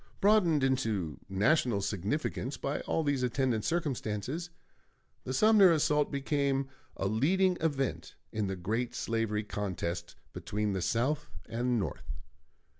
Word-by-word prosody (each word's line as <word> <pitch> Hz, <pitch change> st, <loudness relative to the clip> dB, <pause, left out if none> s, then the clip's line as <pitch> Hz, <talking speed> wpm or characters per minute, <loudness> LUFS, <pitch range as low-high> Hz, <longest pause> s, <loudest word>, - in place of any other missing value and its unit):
Broadened 185 Hz, -8 st, +4 dB
into 110 Hz, -, 0 dB
national 110 Hz, +3 st, +2 dB
significance 110 Hz, -, -2 dB
by 140 Hz, +2 st, -2 dB
all 160 Hz, -, +1 dB
these 145 Hz, -3 st, 0 dB
attendant 125 Hz, -3 st, 0 dB
circumstances, 145 Hz, -, -2 dB, 0.8 s
the -, -, -3 dB
Sumner 200 Hz, +5 st, +6 dB
assault 150 Hz, -2 st, +2 dB
became 140 Hz, -1 st, 0 dB, 0.3 s
a -, -, -2 dB
leading 180 Hz, -, +2 dB
event 140 Hz, -5 st, -1 dB, 0.2 s
in 110 Hz, -2 st, -1 dB
the 95 Hz, -, -2 dB
great 110 Hz, +7 st, -2 dB
slavery 115 Hz, -2 st, -1 dB
contest 85 Hz, -4 st, -4 dB, 0.2 s
between 105 Hz, 0 st, -2 dB
the 95 Hz, -, -1 dB
South 140 Hz, -, 0 dB, 0.2 s
and 120 Hz, +1 st, 0 dB
North. 100 Hz, -, -4 dB
125 Hz, 120 wpm, -31 LUFS, 105-150 Hz, 0.8 s, Sumner